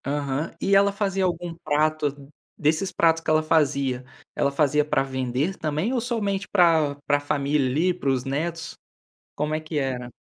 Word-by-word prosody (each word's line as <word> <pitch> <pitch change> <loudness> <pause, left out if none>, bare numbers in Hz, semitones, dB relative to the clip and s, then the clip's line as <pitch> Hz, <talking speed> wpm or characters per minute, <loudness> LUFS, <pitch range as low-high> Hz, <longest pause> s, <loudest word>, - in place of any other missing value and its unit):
Aham, 140 +2 -2
e 195 - +2
ela 200 +1 +5
fazia 195 -1 -1
algum 175 -1 -2
prato, 145 -2 0 0.3
desses 160 +5 +1
pratos 165 -1 +3
que - - -4
ela 155 0 +3
fazia, 140 -5 +1 0.3
ela 140 - +1
fazia 150 +1 +2
para 150 -2 +1
vender 130 +6 -2
também 155 - -1
ou 250 - 0
somente 205 -5 -2
para 165 -6 +4
para 145 0 +2
família, 145 -1 0
ali, 165 +8 +2
para 170 -6 -2
os 130 -2 +1
netos? 165 +5 -3 0.6
Como 150 +1 -1
é 155 - -1
que 155 0 -4
era? 125 -3 -3
155 Hz, 170 wpm, -24 LUFS, 140-170 Hz, 0.6 s, ela